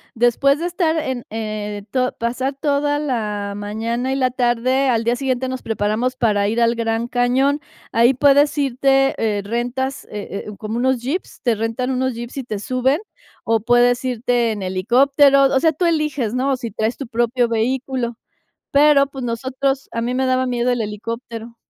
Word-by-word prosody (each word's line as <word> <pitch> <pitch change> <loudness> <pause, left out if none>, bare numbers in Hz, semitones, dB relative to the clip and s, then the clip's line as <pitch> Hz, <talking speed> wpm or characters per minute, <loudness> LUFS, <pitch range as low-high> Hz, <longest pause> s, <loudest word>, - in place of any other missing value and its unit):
después 240 +4 +3
de 335 - -3
estar 345 -2 0
en, 260 -6 -2
eh, 210 -2 -4
to 255 +1 0
pasar 255 +4 -2
toda 290 0 +1
la 210 -8 -2
mañana 225 +5 -3
y - - 0
la 255 -2 +1
tarde, 255 +2 +1
al 230 -2 +1
día 235 +1 +1
siguiente 260 -1 -1
nos 260 0 -4
preparamos 225 +3 -1
para 205 -5 +1
ir 225 +3 0
al 235 0 +3
Gran 230 0 -1
Cañón. 255 +4 +1 0.3
Ahí 235 +3 +4
puedes 285 +2 +4
irte, 270 0 +2
eh, 210 -3 0
rentas, 245 +5 -3
eh 205 -1 -6
eh, - - -5
como 220 +1 -4
unos 260 +1 +1
jeeps, 280 +10 -4
te 240 - +3
rentan 225 +4 -2
unos 260 -1 -1
jeeps 240 +3 -7
y 270 - -3
te 215 -4 -4
suben, 255 +7 0 0.4
o 225 0 +2
puedes 245 +2 +3
irte 245 -1 0
en 205 -3 -4
helicópteros, 270 +9 +4
o 265 - +4
sea, 320 +3 +3
tú 350 +5 -1
eliges, 300 -8 0
¿no?, 260 +1 0
si 235 -3 -6
traes 220 +3 -2
tu 275 - -5
propio 240 +1 +1
vehículo. 240 +1 -1 0.5
Pero, 285 -1 +5
pues, 270 -2 -8
nosotros 260 +3 -2
a 230 - -3
mí 240 +2 -1
me 260 +1 0
daba 255 0 +2
miedo 245 0 0
el 245 -1 0
helicóptero. 230 +2 -6
245 Hz, 180 wpm, -20 LUFS, 230-270 Hz, 0.5 s, Pero